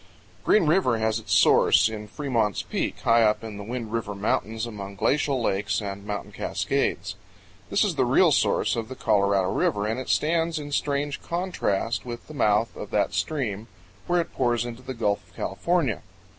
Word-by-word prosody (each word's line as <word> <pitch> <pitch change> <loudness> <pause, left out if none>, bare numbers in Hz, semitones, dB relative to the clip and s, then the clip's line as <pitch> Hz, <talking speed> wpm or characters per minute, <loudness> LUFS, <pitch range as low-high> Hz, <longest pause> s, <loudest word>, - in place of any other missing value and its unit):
GREEN 210 -5 +4
RIVER 155 -7 +3
has 110 0 0
its 110 - -9
source - - +5
in 105 -1 -6
Fremont's 115 -4 -1
Peak, - - -3
high 115 0 +4
up 105 0 +2
in 110 -2 -7
the 100 - -7
Wind 115 0 -5
River 110 -3 -2
Mountains 110 +2 -1
among 100 -4 -7
glacial 140 +5 +1
lakes 100 -2 0
and 100 -2 -6
mountain 105 0 -4
cascades. - - -1 0.6
This - - +3
is - - +1
the - - +1
real - - +4
source - - +2
of 115 0 -4
the 130 - -6
Colorado 100 -4 +2
River, 100 +1 0
and 110 +3 -1
it 130 - -6
stands 165 +1 +1
in 145 -1 -6
strange 145 0 -1
contrast 170 - -1
with 120 -1 -7
the 155 - -10
mouth 110 -4 +1
of - - -7
that - - 0
stream 115 -8 -2 0.4
where 175 0 +2
it 170 - -3
pours 120 -2 +1
into 120 +1 -7
the 130 0 -6
Gulf 105 -3 -1
of - - -25
California. 170 - -1
115 Hz, 185 wpm, -25 LUFS, 105-140 Hz, 0.6 s, source